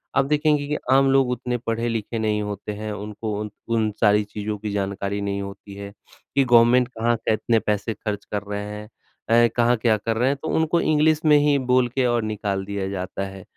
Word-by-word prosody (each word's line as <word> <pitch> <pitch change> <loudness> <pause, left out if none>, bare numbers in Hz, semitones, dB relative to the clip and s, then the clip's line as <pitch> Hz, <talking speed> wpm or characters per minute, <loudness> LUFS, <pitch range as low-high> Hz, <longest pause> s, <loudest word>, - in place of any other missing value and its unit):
आप 135 - +3
देखेंगे 150 0 +1
कि 150 - -1
आम 135 0 +5
लोग 135 -2 +3
उतने 125 0 -2
पढ़े-लिखे 115 -1 -3
नहीं 105 -1 0
होते 105 0 -5
हैं, 105 +1 -5
उनको 105 +1 -5
उन 105 0 -4 0.3
उन 110 -1 +1
सारी 105 -1 +4
चीज़ों 105 +1 -5
की 105 0 -5
जानकारी 100 0 -2
नहीं 100 0 -2
होती 100 0 -9
है 100 0 -8 0.4
कि 140 - +5
गवर्नमेंट 120 0 +5
कहाँ 120 -1 0
कितने 110 +1 +2
पैसे 105 +1 -1
खर्च 105 -1 -5
कर 105 - -3
रहे 105 0 -3
हैं 105 0 -8 0.6
अ, - - +4
कहाँ 120 0 +3
क्या 110 -1 +2
कर 110 +2 -2
रहे 125 +3 +2
हैं 140 - 0
तो - - -5
उनको 160 +1 +2
इंग्लिश 155 0 +2
में 150 -1 +6
ही 145 -1 +3 0.2
बोल 125 -1 +4
के 130 -2 +2
और 120 -2 +1
निकाल 100 -2 -3
दिया 100 -1 -3
जाता 95 0 -4
है। 95 -1 -10
110 Hz, 210 wpm, -23 LUFS, 105-125 Hz, 0.6 s, में